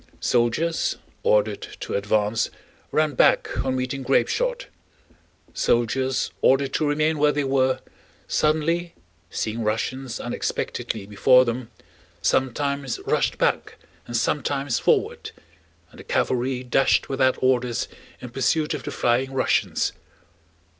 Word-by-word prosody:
Soldiers 125 +8 +1 0.2
ordered 105 -1 +2 0.2
to - - -4
advance 105 +2 +1 0.4
ran 155 -1 +2
back - - +3
on 130 -1 -1
meeting 130 +1 -2
grapeshot; - - +1 0.9
soldiers 130 +3 +1
ordered 135 +1 +3
to 155 - +1
remain 155 +1 +1
where 150 0 +4
they 145 0 -1
were, 130 -1 +1 0.5
suddenly, 165 +3 +1 0.3
seeing 115 +1 -3
Russians 120 +3 -2
unexpectedly 115 -3 -3
before 125 +5 +5
them, 120 0 -3 0.5
sometimes 140 0 0
rushed - - +1
back - - 0 0.3
and 120 - -1
sometimes 135 +1 0
forward, - - +1 0.6
and - - -16
the - - -9
cavalry 130 0 0
dashed 130 +2 +2
without 130 -1 +2
orders 125 -2 +1 0.3
in 125 - -7
pursuit 135 +5 +1
of - - -4
the - - -6
flying 125 +3 +1
Russians. 130 - +1
130 Hz, 115 wpm, -24 LUFS, 120-145 Hz, 0.9 s, before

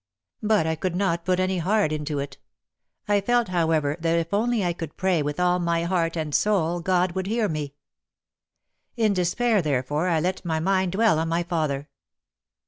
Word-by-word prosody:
But 210 -5 +2
I 160 - +1
could 175 +2 -3
not 175 -3 0
put 185 0 +1
any 185 0 0
heart 190 -1 +1
into 150 -1 -3
it. 140 0 -5 0.7
I 205 -1 +3
felt, 240 +1 +1
however, 160 -4 +1
that 165 0 +1
if 165 +2 -2
I - - +4
only 215 -6 +1
could 165 -3 -8
pray 185 -4 +1
with 145 +2 -3
all 180 0 +2
my 170 -1 0
heart 170 -2 0
and 155 -2 -3
soul, 175 -4 +1
God 180 +1 +1
would 190 +1 -3
hear 225 0 +1
me. 150 -4 -4 1.2
In 220 -3 +2
despair, 200 +4 +1
therefore, 145 +2 -1
I 165 -3 +2
let 180 +4 -2
my 160 -3 -1
mind 190 +1 +1
dwell 210 -5 +3
on 165 - -1
my 170 +1 0
father. 155 -5 -2
175 Hz, 185 wpm, -24 LUFS, 160-190 Hz, 1.2 s, I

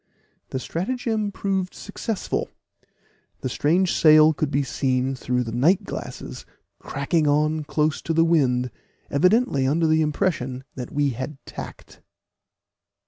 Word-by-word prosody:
The - - -3
stratagem 215 - -2
proved 190 -2 -2
successful; 210 +1 -3 0.9
the 130 - -2
strange 170 +8 +2
sail 155 0 +6
could 150 -1 -1
be 140 0 +1
seen 130 0 0
through 125 -1 -1
the 115 - -5
night 150 +11 +3
glasses - - -7 0.4
cracking 150 +3 0
on 150 +1 +2
close 155 +1 0
to 165 - -2
the 165 0 +5
wind, 125 -7 +2 0.4
evidently 180 - +3
under 160 +4 +2
the 160 0 +3
impression 150 -5 -1
that 125 -2 -7
we 145 -1 +1
had 130 +4 -5
tacked. - - -10
150 Hz, 130 wpm, -24 LUFS, 135-175 Hz, 0.9 s, sail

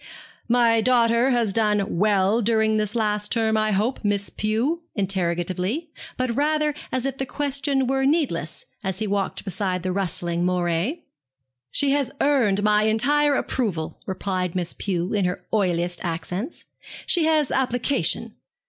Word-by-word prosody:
'My 235 -1 +4
daughter 235 +1 +3
has 235 -6 +1
done 210 -5 +1
well 205 +2 +3
during 220 -1 +2
this 210 +1 -1
last 210 -2 0
term, 220 -2 +2
I 215 0 +2
hope, 215 +6 0
Miss 205 -1 0
Pew?' 230 +11 -1
he - - -37
said, 210 -10 -4
interrogatively, 185 - -2 0.3
but 255 -2 -1
rather 300 +1 +1 0.2
as 255 0 -1
if 270 -1 -3
the 270 - -1
question 280 -1 0
were 270 +1 0
needless, 265 - 0 0.2
as 190 -1 -2
he 215 - -2
walked 200 0 -2
beside 190 -2 -2
the 185 - -1
rustling 175 -2 -2
moiré. 180 - 0 0.7
'She 280 - +2
has 280 -3 +1
earned 230 -9 +2
my 210 0 +3
entire 285 +7 +2
approval,' 195 -13 -2
replied 185 -2 -2
Miss 175 -2 -1
Pew, 180 -2 -2
in 200 -3 +1
her 180 0 -3
oiliest 175 -4 0
accents. 180 - -4 0.4
'She 340 -4 +3
has 310 -3 +2
application.' 260 +1 0
215 Hz, 150 wpm, -23 LUFS, 190-260 Hz, 0.7 s, My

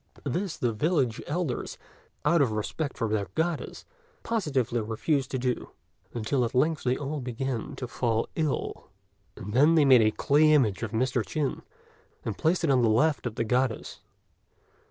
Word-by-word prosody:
This 175 +7 -2
the 120 -2 0
village 135 -2 0
elders, 150 -5 -3 0.5
out 170 -2 +4
of 130 -5 +2
respect 140 +8 -3
for 115 - 0
their 105 -2 -1
Goddess, 165 -1 -2 0.4
positively 140 - 0
refused 130 +6 -1
to 130 - -2
do; 125 -1 -2 0.4
until 120 +3 0
at 120 +1 -3
length 155 +4 +2
they 125 0 0
all 145 +1 -4
began 125 -1 -4
to 125 - -5
fall 115 -2 -1
ill, 155 -10 -2 0.5
and 105 +2 -7
then 150 +7 +5
they 155 -3 +5
made 130 -3 +7
a 110 - +4
clay 150 +7 +3
image 115 -10 +2
of 115 - -2
Mr. 125 +2 0
Chin, 140 +8 -2 0.6
and 110 - -2
placed 170 - +1
it 155 - +3
on 130 -2 +4
the 115 - +3
left 125 +5 +2
of 110 - -6
the 115 - 0
Goddess. 125 +1 -1
130 Hz, 170 wpm, -27 LUFS, 115-150 Hz, 0.6 s, made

